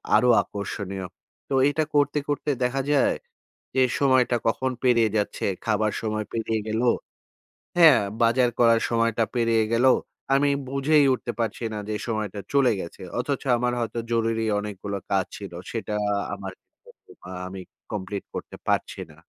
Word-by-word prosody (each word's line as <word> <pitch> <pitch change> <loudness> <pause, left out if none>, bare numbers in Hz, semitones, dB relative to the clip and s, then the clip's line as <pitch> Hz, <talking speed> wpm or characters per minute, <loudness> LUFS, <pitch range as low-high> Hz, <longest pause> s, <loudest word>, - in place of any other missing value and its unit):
আরো 125 - +4
আকর্ষণীয়। 100 -1 -5 0.4
তো - - -2 0.2
এটা 155 +2 0
করতে, 145 +1 +3
করতে 145 +1 -1
দেখা 135 +2 0
যায়, 140 - +3 0.6
যে, 130 - +4 0.2
সময়টা 130 -3 +3
কখন 130 +3 +1
পেরিয়ে 115 -3 +4
যাচ্ছে, 105 - -2 0.2
খাবার 110 -1 +1
সময় 110 -1 -2
পেরিয়ে 110 -1 -1
গেল। 110 +2 -1 1.0
হ্যাঁ? 160 -6 +8 0.2
বাজার 120 +2 +4
করার 115 -1 +5
সময়টা 115 -1 +2
পেরিয়ে 115 -2 +2
গেল। 120 +3 +3 0.5
আমি 145 +1 +3 0.2
বুঝেই 140 +2 +3
উঠতে 120 -1 -4
পারছি 115 +1 -2
না 105 - -4
যে, 105 - -2
সময়টা 105 -3 -2
চলে 135 -4 +4
গেছে। 85 +3 -8 0.2
অথচ 135 +2 -1 0.2
আমার 125 +1 0
হয়তো 115 0 -3
জরুরি 115 -1 +1 0.2
অনেকগুলো 100 -1 -5
কাজ 95 -2 +2
ছিল। 100 -4 -8 0.2
সেটা 110 -2 -3 0.2
আ - - +1 0.2
আমার 95 -1 -7 0.8
আ - - -7 0.2
আমি 95 0 -7 0.3
কমপ্লিট 100 -1 -4
করতে - - -6
পারছি - - 0
না। - - -15
115 Hz, 150 wpm, -25 LUFS, 105-130 Hz, 1.0 s, হ্যাঁ